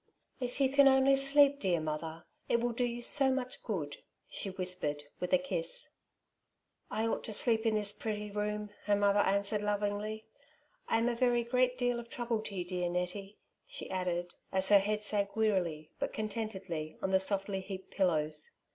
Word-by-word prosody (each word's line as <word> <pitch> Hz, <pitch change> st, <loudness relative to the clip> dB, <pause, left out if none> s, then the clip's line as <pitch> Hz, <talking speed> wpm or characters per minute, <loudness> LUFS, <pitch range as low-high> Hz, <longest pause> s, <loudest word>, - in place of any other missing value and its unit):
^ -, -, -31 dB
li 250 Hz, -, 0 dB
If 245 Hz, -, -8 dB
you 275 Hz, -, +5 dB
can 280 Hz, +1 st, +5 dB
only 265 Hz, 0 st, +5 dB
sleep, 280 Hz, +1 st, +4 dB
dear 180 Hz, -6 st, +1 dB
mother, 160 Hz, +1 st, -4 dB, 0.2 s
it 235 Hz, -, +3 dB
will 240 Hz, +1 st, 0 dB
do 240 Hz, +2 st, -1 dB
you 240 Hz, 0 st, -4 dB
so 270 Hz, +2 st, +4 dB
much 260 Hz, -1 st, -3 dB
good/' 165 Hz, -11 st, -4 dB, 0.3 s
she 195 Hz, -, -3 dB
whispered, 180 Hz, -6 st, 0 dB, 0.2 s
with 180 Hz, -, -3 dB
a 275 Hz, -, +6 dB
kiss. -, -, -4 dB, 0.5 s
'' -, -, -52 dB, 0.2 s
I 220 Hz, -, -1 dB
ought 225 Hz, -, -1 dB
to 220 Hz, -, -3 dB
sleep 225 Hz, +1 st, +2 dB
in 220 Hz, -, +2 dB
this 205 Hz, -1 st, +2 dB
pretty 210 Hz, -1 st, -4 dB
room,'' 210 Hz, 0 st, -3 dB
her 205 Hz, -, +3 dB
mother 205 Hz, 0 st, +3 dB
answered 200 Hz, +1 st, +2 dB
lovingly. 210 Hz, +1 st, -2 dB, 0.3 s
" -, -, -39 dB
I -, -, +3 dB
am 230 Hz, +1 st, +1 dB
a 245 Hz, -, +1 dB
very 240 Hz, 0 st, +2 dB
great 250 Hz, +1 st, +1 dB
deal 245 Hz, -1 st, 0 dB
of 235 Hz, 0 st, -9 dB
trouble 235 Hz, -2 st, -2 dB
to 205 Hz, -, -7 dB
you, 180 Hz, -2 st, -2 dB
dear 180 Hz, -1 st, -2 dB
Nettie," 180 Hz, +3 st, -3 dB, 0.3 s
she -, -, -6 dB
added^ 175 Hz, -2 st, -2 dB, 0.2 s
as 190 Hz, 0 st, +4 dB
her 205 Hz, -1 st, +8 dB
head 210 Hz, +2 st, -1 dB
sank 200 Hz, -1 st, +1 dB
wearily, 180 Hz, -8 st, 0 dB
but -, -, -2 dB
contentedly, 195 Hz, -8 st, -4 dB
on 190 Hz, -, 0 dB
the 190 Hz, -, +5 dB
softly 195 Hz, 0 st, 0 dB
heaped 190 Hz, 0 st, -8 dB
pillows. 155 Hz, -5 st, 0 dB
210 Hz, 195 wpm, -32 LUFS, 190-240 Hz, 0.5 s, her